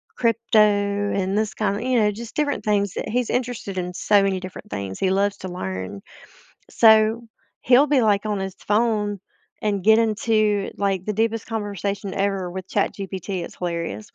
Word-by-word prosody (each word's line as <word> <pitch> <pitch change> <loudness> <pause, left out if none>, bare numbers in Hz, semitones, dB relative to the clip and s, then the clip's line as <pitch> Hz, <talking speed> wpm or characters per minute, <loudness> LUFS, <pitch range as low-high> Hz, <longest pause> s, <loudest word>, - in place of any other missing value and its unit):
crypto 230 -1 +1
and 205 -1 +1
this 215 -1 0
kinda 205 0 -1
you 255 -2 +2
know, 210 -1 +3
just 230 +2 -9
different 295 -1 -1
things 200 -2 +1
that - - -4
he's 245 +1 0
interested 245 -6 -3
in, 180 0 -3
so 205 +2 +3
many 190 -1 0
different 185 0 -9
things. 100 -2 -5
He 190 - +1
loves 200 +1 +1
to 190 - -7
learn. 95 - -5 0.7
So, 220 +1 +5 0.4
he'll 260 +4 +5
be, 275 -3 +3
like, 205 -2 +2
on 205 -2 -1
his 190 0 -4
phone 210 -2 0 0.4
and 205 -4 -1
get 220 +2 +6
into, 215 -2 +1
like, 195 -2 -1
the 210 - -1
deepest 225 +1 0
conversation 200 -2 -3
ever 195 -2 -1
with 190 0 -7
ChatGPT, 190 -2 -2
it's - - -9
hilarious. 175 +4 -4
205 Hz, 170 wpm, -23 LUFS, 190-220 Hz, 0.7 s, get